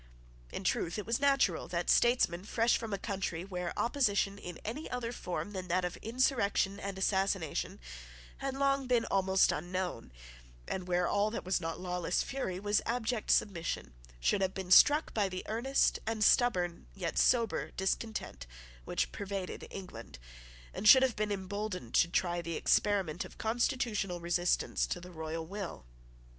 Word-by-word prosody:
In - - -5
truth 170 - 0
it 210 - -4
was 230 +1 0
natural 275 -1 +2
that - - -2
statesmen 240 -8 +3
fresh 230 +3 +2
from 225 -2 -4
a 200 - -1
country 190 -4 -3
where 180 -2 -4
opposition 205 -6 +1
in 175 -3 -7
any 240 +9 -5
other 245 -2 -3
form 205 -3 -4
than 185 -2 -5
that 180 +1 +1
of 175 - -3
insurrection 225 -5 +1
and 195 -1 -5
assassination 190 -4 0 0.6
had 270 -1 -3
long 275 -1 +1
been 245 -2 +2
almost 190 -1 +3
unknown, 175 - -4 0.6
and 185 -1 -4
where 180 -1 +1
all 205 +1 +2
that 220 - -5
was 185 0 0
not 165 0 -4
lawless 180 -1 -1
fury 190 -9 -3
was 205 +1 +1
abject 235 -1 -1
submission, 170 - 0 0.3
should 195 - +1
have 190 0 0
been 190 -2 -5
struck 295 +10 +6
by 205 -3 +1
the 185 0 -5
earnest 240 +5 +1
and 225 -1 0
stubborn, 180 -9 +2
yet 180 -4 -2
sober, 235 -3 +2
discontent 190 - -3 0.4
which - - -1
pervaded 195 -2 -5
England, 115 - -9 0.6
and 210 - +3
should 260 +2 +9
have 255 -3 +1
been 210 0 -1
emboldened 195 - -4
to - - +5
try 175 0 0
the 170 -1 -4
experiment 190 -4 +1
of - - -12
constitutional 220 -5 -1
resistance 175 +1 0
to - - -3
the 180 +1 -11
royal 160 0 -5
will. 190 - -6
195 Hz, 160 wpm, -32 LUFS, 180-225 Hz, 0.6 s, should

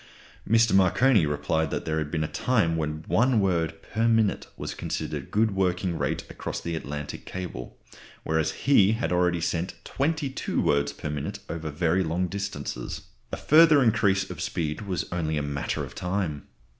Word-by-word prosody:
Mr. 115 +1 +4
Marconi 95 - +4
replied 75 +2 0
that - - -3
there 80 0 0
had 75 -1 -3
been 80 0 -1
a - - -1
time 105 -5 +1
when 75 -1 -3
one 125 0 +3
word 85 -4 0
per 115 +2 0
minute 115 -3 +2
was - - -4
considered - - -3
a - - -13
good 110 +1 +2
working 90 -2 0
rate - - -1
across - - -5
the 85 -1 -4
Atlantic 75 -2 -5
cable; 90 -9 -7 0.5
whereas 80 0 +1
he 110 -7 +5
had 110 -3 -2
already 90 -1 +2
sent 85 +1 -2
twenty 150 +1 -1
two 130 - -3
words 70 0 +2
per 75 +1 -5
minute 75 -2 -4
over 80 -2 -4
very 85 +5 +1
long 85 +2 0
distances. 85 -9 -4 0.3
A - - -3
further 155 -2 +6
increase 100 -4 +2
of 90 - -7
speed 85 -3 -2
was 95 -4 -2
only 80 -3 -1
a 75 - -1
matter 70 -1 -2
of - - -12
time. 90 -6 -3
90 Hz, 175 wpm, -26 LUFS, 80-105 Hz, 0.5 s, further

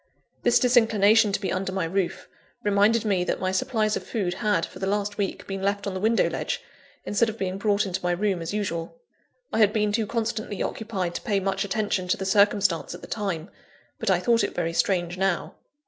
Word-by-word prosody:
This 240 - +4
disinclination 225 -3 +4
to 195 - 0
be 195 - -2
under 190 0 -2
my 185 -2 -1
roof, 185 +1 -2 0.4
reminded 210 +2 +3
me 190 -4 +2
that - - -1
my 185 0 0
supplies 215 +2 0
of - - -3
food 195 -6 -2
had, 210 +1 +1
for - - -12
the 190 - -2
last 205 +1 -1
week, 200 - -2
been 195 -1 -5
left 200 +1 -1
on 200 - -2
the 185 - -3
window 225 +3 +3
ledge, - - -2 0.5
instead 225 +2 +2
of 220 - -6
being 190 -2 -3
brought 205 0 +2
into 190 0 -3
my 180 - 0
room 190 0 0
as 165 - -4
usual. 200 - -3 0.5
I - - +1
had 210 -2 +5
been 210 -1 +1
too 220 0 0
constantly 220 -3 -2
occupied 195 -6 -3
to - - -4
pay 200 -2 0
much 195 +1 -1
attention 200 -2 -1
to 180 - +1
the 190 - -4
circumstance 200 -3 +2
at - - -11
the - - -10
time; 195 -5 -3 0.5
but - - -1
I - - +4
thought 235 -1 +3
it - - -2
very 165 -1 -1
strange 175 0 0
now. 190 -2 0
200 Hz, 215 wpm, -25 LUFS, 190-215 Hz, 0.5 s, had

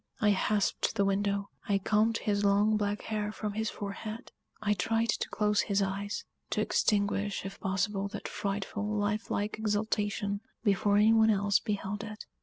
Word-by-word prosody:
I 210 - +4
hasped 205 +2 +1
the 200 -2 +2
window; 200 0 0 0.2
I 200 - +4
combed 215 +3 +2
his 205 -2 0
long, 205 +2 +4
black 205 0 -1
hair 210 -1 -2
from 210 -1 -4
his 220 +1 -1
forehead; 215 +3 -6 0.3
I 210 -1 +1
tried 225 +4 0
to - - 0
close 210 -1 +2
his 200 -1 0
eyes 200 +2 -3 0.2
to - - -1
extinguish, 205 -2 +1
if 195 0 -7
possible, 195 +1 -1
that 200 - -6
frightful, 205 0 -3
lifelike 210 0 -1
exultation, 205 -1 -1 0.2
before 205 -1 +3
any 215 +2 +6
one 220 0 +5
else 205 -1 +3
beheld 205 -1 -3
it. 215 0 -8
205 Hz, 160 wpm, -30 LUFS, 200-215 Hz, 0.3 s, any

